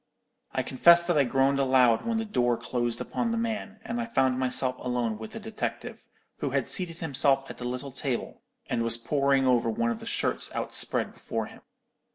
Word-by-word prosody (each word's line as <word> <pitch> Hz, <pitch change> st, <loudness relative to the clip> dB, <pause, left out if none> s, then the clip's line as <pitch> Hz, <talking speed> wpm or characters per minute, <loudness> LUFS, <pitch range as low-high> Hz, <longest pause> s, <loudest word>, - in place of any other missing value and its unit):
"I -, -, -1 dB
confess 170 Hz, +6 st, +5 dB
that 175 Hz, -1 st, 0 dB
I 145 Hz, -2 st, +4 dB
groaned 135 Hz, +2 st, +2 dB
aloud 130 Hz, -, +3 dB
when 230 Hz, -1 st, 0 dB
the 225 Hz, -, -1 dB
door 120 Hz, -, +1 dB
closed 120 Hz, 0 st, -2 dB
upon 240 Hz, -, -2 dB
the 230 Hz, -, -1 dB
man, 220 Hz, -2 st, -3 dB
and 235 Hz, +1 st, -2 dB
I 235 Hz, -, -4 dB
found 130 Hz, -, +1 dB
myself 130 Hz, 0 st, +1 dB
alone 120 Hz, -3 st, -2 dB
with 110 Hz, -, -8 dB
the -, -, -6 dB
detective, 220 Hz, 0 st, -5 dB, 0.3 s
who -, -, -1 dB
had -, -, -1 dB
seated 175 Hz, -4 st, -2 dB
himself 135 Hz, -3 st, +2 dB
at -, -, -11 dB
the 125 Hz, -, -6 dB
little 125 Hz, +3 st, -4 dB
table, 130 Hz, -2 st, -4 dB, 0.2 s
and 120 Hz, -2 st, -1 dB
was 115 Hz, 0 st, +2 dB
poring 140 Hz, +2 st, +1 dB
over 120 Hz, -3 st, +3 dB
one 115 Hz, +1 st, 0 dB
of 115 Hz, -, -4 dB
the -, -, -9 dB
shirts -, -, -1 dB
outspread -, -, 0 dB
before -, -, -4 dB
him. -, -, -14 dB
135 Hz, 200 wpm, -27 LUFS, 125-170 Hz, 0.3 s, confess